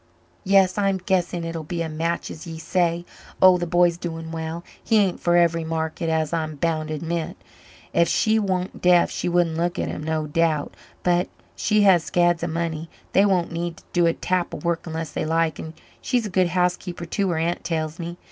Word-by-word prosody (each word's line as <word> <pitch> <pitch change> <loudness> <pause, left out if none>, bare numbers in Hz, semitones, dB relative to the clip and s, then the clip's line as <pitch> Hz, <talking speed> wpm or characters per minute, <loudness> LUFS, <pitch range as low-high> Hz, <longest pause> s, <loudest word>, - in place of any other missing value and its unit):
"Yes, 195 -1 +4
I'm 195 -1 +2
guessing 180 -2 -1
it'll 165 0 -4
be 170 +2 -3
a - - -3
match 165 +2 -2
as 165 +3 -9
ye 165 -1 -6
say. 170 +1 0 0.3
Oh 185 -1 +7
the 175 - -2
b'y's 175 0 +3
doing 165 -2 -5
well. 165 +1 -4 0.2
He 225 - +3
ain't 195 -4 +2
for 175 0 +2
every 170 -1 +3
market, 160 +1 -2
as 160 -1 0
I'm 155 -2 -2
bound 155 +1 -1
to 155 - -3
admit. 165 +1 -3 0.6
Ef 170 - +4
she 220 +5 +2
wan't 185 -2 -2
deaf 180 -1 +4
she - - -2
wouldn't 170 -2 +1
look 175 +1 -1
at - - -1
him, - - -5
no 160 0 -1
doubt. 155 -1 0 0.3
But 175 0 +2 0.3
she 210 0 +2
has 185 -5 +5
scads 175 -1 +2
of 170 - -2
money 165 -1 -3 0.2
they 200 +2 +5
won't 180 -4 +1
need 170 0 -3
to - - -16
do 175 -1 +4
a 165 - +3
tap 180 0 -1
of - - -9
work 170 0 -1
unless 160 -1 -4
they - - -2
like 165 0 0
and 160 0 -7 0.3
she's 245 -3 0
a 210 - -5
good 185 0 +3
housekeeper 180 0 -1
too 195 +3 -1
her 170 - 0
aunt 170 +2 -1
tells 160 -1 -2
me. 170 +1 -5
170 Hz, 210 wpm, -23 LUFS, 160-180 Hz, 0.6 s, Oh